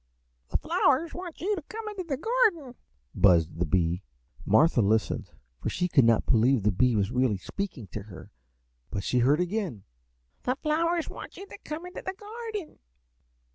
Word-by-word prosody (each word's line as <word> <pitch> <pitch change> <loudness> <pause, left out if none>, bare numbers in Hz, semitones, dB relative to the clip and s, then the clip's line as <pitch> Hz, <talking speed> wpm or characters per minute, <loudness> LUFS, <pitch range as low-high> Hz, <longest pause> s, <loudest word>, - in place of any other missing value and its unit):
"The - - +1
flowers 290 +5 +2
want 355 -2 -7
you 410 +4 +1
to 350 - -5
come 440 +8 -8
into 410 -3 -4
the 295 -6 -3
garden," 395 - +1 0.4
buzzed 85 -4 +4
the 90 - +1
bee. 85 +2 +1 0.5
Martha 120 +5 +5
listened, 110 +2 +1 0.3
for - - -2
she 180 - 0
could 145 -8 +4
not 115 -1 +4
believe 120 -1 +3
the 105 - +3
bee 120 +5 +3
was 100 0 +1
really 125 -5 +2
speaking 175 - -5
to 105 - -5
her, 100 -2 -12 0.6
but 100 - -3
she 125 - +1
heard 140 +6 +4
again, 180 - -2 0.6
"The 255 - 0
flowers 325 +3 0
want - - -9
you 395 - -8
to 400 - -11
come 310 +3 -6
into 360 - -7
the 380 - -5
garden." 425 -3 -7
180 Hz, 175 wpm, -28 LUFS, -, 0.6 s, Martha